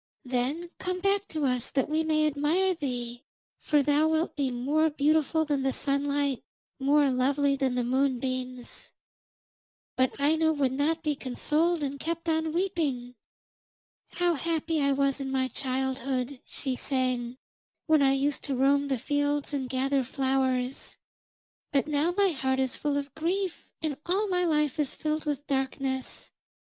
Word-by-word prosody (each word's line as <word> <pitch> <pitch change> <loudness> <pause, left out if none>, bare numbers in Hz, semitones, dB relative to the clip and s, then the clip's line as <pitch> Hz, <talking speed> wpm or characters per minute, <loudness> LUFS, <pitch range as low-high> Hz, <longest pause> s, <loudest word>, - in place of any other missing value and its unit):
Then 265 +8 -1
come 365 0 -2
back 395 +1 +1
to 310 -2 -2
us 250 -2 0
that 270 - 0
we 310 +1 +1
may 310 -1 +2
admire 305 +6 +2
thee, 245 -6 -4 0.4
for 295 -2 +2
thou 295 +2 +3
wilt 320 +1 0
be 280 -2 0
more 285 +6 +1
beautiful 310 +1 +2
than 290 -2 0
the 265 0 0
sunlight, 280 -1 0 0.4
more 280 +1 +4
lovely 275 +2 +2
than 265 -2 0
the 250 - +1
moonbeams.' 255 -1 -2 1.0
But 255 +1 +1
Aino 315 +2 +3
would 280 -4 +1
not 305 +5 0
be 305 -2 +1
consoled, 300 +6 +1
and 280 0 -3
kept 335 +2 -3
on 320 -1 +1
weeping. 310 -9 -1 1.0
'How 350 -1 +2
happy 325 0 -1
I 280 0 +3
was 275 0 +1
in 270 -1 -3
my 260 -1 +1
childhood,' 260 0 -2
she 265 -2 -2
sang, 255 -2 -1 0.5
'when 315 -3 +4
I 270 -1 +5
used 280 +1 0
to 275 - -1
roam 280 +2 +3
the 270 -2 0
fields 290 +3 -1
and 265 -3 -2
gather 270 +1 +1
flowers, 260 0 -1 0.7
but 275 -2 +2
now 300 +3 +1
my 400 -1 +5
heart 265 -4 0
is 260 -1 0
full 290 -1 -1
of 280 -1 -4
grief 360 +4 -2
and 305 -3 0
all 395 +4 +1
my 360 -1 +1
life 300 -3 +1
is 290 -3 0
filled 310 0 -2
with 290 -1 -2
darkness. 265 -1 -2
280 Hz, 155 wpm, -28 LUFS, 265-315 Hz, 1.0 s, I